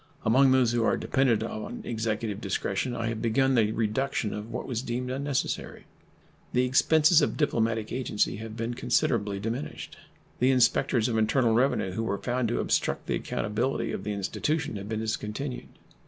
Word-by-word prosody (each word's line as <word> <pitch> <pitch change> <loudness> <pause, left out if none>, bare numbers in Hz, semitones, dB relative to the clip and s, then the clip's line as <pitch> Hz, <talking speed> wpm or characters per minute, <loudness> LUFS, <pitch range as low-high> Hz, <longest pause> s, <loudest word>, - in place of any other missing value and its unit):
Among 130 +5 +5
those 130 -3 +4
who 120 -1 +1
are - - +2
dependent 125 -5 +1
on 110 -1 -5
Executive 110 -2 -2
discretion 100 +5 -2
I 115 -1 -2
have 115 -1 -4
begun 135 +3 +2
the 110 -4 +3
reduction 110 +1 -1
of 105 +2 -6
what - - -4
was 120 -3 -2
deemed 125 0 -3
unnecessary. 140 0 -2 0.7
The 125 +1 +3
expenses 155 +5 +5
of 145 - 0
diplomatic 115 -7 0
agency 120 -5 0
have 110 +1 -8
been 115 +1 -2
considerably 105 -4 0
diminished. 115 +7 -5 0.4
The 125 - +4
inspectors 120 -2 +3
of 115 -2 0
internal 115 +1 +2
revenue 120 -5 +2
who 110 - -3
were 105 -3 -1
found 125 +1 -1
to 120 - -1
obstruct - - 0
the - - -1
accountability 120 +6 -2
of - - -4
the 105 - -2
institution 145 - -2
have 100 +1 -7
been 110 -1 -2
discontinued. 110 +4 -4
115 Hz, 170 wpm, -27 LUFS, 110-130 Hz, 0.7 s, Among